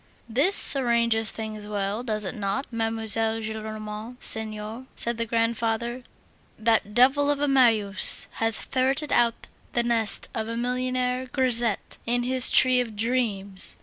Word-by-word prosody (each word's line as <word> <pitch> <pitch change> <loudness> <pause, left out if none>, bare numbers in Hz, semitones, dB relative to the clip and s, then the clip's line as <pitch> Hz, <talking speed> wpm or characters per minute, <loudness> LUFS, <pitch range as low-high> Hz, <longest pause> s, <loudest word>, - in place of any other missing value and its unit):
"This 280 - +3
arranges 235 -4 +2
things 215 -1 -6
well, 205 +1 -2
does 215 -4 -3
it 190 - -4
not, 210 +6 -2
Mademoiselle 225 -1 -1
Gillenormand 215 +1 -6
senior?" 220 +2 -4
said 235 0 -2
the 230 - -1
grandfather. 230 +1 -1 0.6
"That 220 -2 +1
devil 270 +4 +4
of 290 -1 +1
a 290 - +1
Marius 225 -7 +3
has 225 -1 +1
ferreted 270 +3 0
out 235 -1 +2 0.3
the 240 - +2
nest 230 -3 0
of 220 -1 -3
a 230 0 -4
millionaire 250 +1 -1
grisette 245 -4 -1
in 245 +1 +1
his 255 0 +3
tree 255 -1 +5
of 225 -3 -6
dreams! 205 -4 +2
230 Hz, 140 wpm, -25 LUFS, 220-250 Hz, 0.6 s, tree